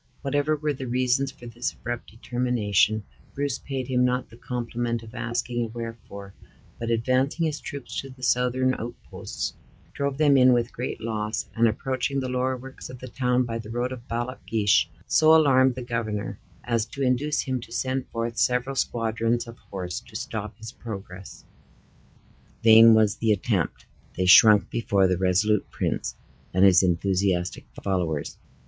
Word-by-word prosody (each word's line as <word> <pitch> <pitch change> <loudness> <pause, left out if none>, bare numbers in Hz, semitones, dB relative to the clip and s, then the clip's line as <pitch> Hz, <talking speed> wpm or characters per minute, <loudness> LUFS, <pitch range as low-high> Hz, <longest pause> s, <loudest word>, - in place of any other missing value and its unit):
Whatever 145 +2 +1
were 150 0 -1
the 130 -1 -6
reasons 130 +2 +1
for 120 - -14
this 120 +1 -4
abrupt 120 0 -6
determination, 115 -3 0 0.3
Bruce 140 -2 -1
paid 135 -2 -4
him 125 -1 +2
not 125 0 0
the - - -13
compliment 120 -1 -3
of 110 0 -12
asking 120 0 -2
a - - -3
wherefore, 115 -4 -8 0.5
but 115 - -3
advancing 130 +7 +1
his 150 -1 -2
troops 130 -6 -6
to 135 - -10
the 130 -1 -13
Southron 125 +1 +2
outposts, 120 +2 -6 0.4
drove 140 -1 -2
them 145 -2 +5
in 130 -1 +6
with 120 0 0
great 125 -1 -4
loss; 110 -1 -3
and, 115 0 +3
approaching 130 +4 -1
the 130 -1 -3
lower 130 +1 0
works 130 +1 -10
of 130 - -9
the 130 - -9
town 125 0 +1
by 115 -1 -4
the 110 -1 -9
road 120 +2 -2
of 125 -1 -8
Ballochgeich, 115 -3 +1 0.2
so 160 0 +5
alarmed 130 -5 +5
the 125 - -5
governor 110 -4 -3 0.2
as 115 -2 0
to 135 +4 -5
induce 135 +4 +1
him 130 -3 -2
to 115 - -12
send 130 +2 -2
forth 115 0 -3
several 125 +3 +1
squadrons 115 -1 0
of 115 0 -12
horse 90 -2 -4
to - - -18
stop 105 -1 -5
his 115 0 -8
progress. 95 -6 -9 1.2
Vain 115 0 +8
was 110 -1 +3
the 110 -1 +1
attempt. 100 -4 -1 0.3
They 95 - +1
shrunk 105 +1 +7
before 100 -4 +2
the 90 -1 0
resolute 95 +3 +2
prince - - -2 0.4
and 95 +1 +6
his 95 -2 +7
enthusiastic 90 -1 0 0.2
followers. 85 -6 -2
120 Hz, 165 wpm, -25 LUFS, 110-130 Hz, 1.2 s, Vain